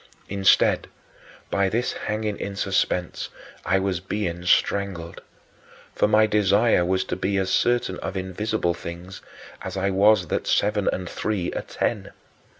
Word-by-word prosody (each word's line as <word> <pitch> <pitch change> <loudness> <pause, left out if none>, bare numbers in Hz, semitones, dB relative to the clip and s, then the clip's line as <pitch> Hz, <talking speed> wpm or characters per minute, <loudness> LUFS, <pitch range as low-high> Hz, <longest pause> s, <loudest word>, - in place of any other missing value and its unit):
Instead, 100 -1 +3 0.6
by 100 -1 +2
this 120 +5 -1
hanging 105 0 -3
in 100 0 -4
suspense, 95 -2 -1 0.3
I 95 - +2
was 95 -2 -1
being 90 -2 -3
strangled. 90 -3 0 0.7
For - - +2
my 110 +1 +5
desire 105 -1 +3
was 95 +1 +1
to - - -4
be 100 +1 -1
as 95 -1 0
certain 120 -4 +1
of 95 0 -4
invisible 95 0 -1
things 85 +3 -8 0.4
as - - -5
I 100 +1 0
was 100 0 +4
that - - -2
seven 105 -1 +2
and 90 -1 -4
three 95 -1 -2
are - - -2
ten. - - -3
95 Hz, 145 wpm, -24 LUFS, 95-105 Hz, 0.7 s, my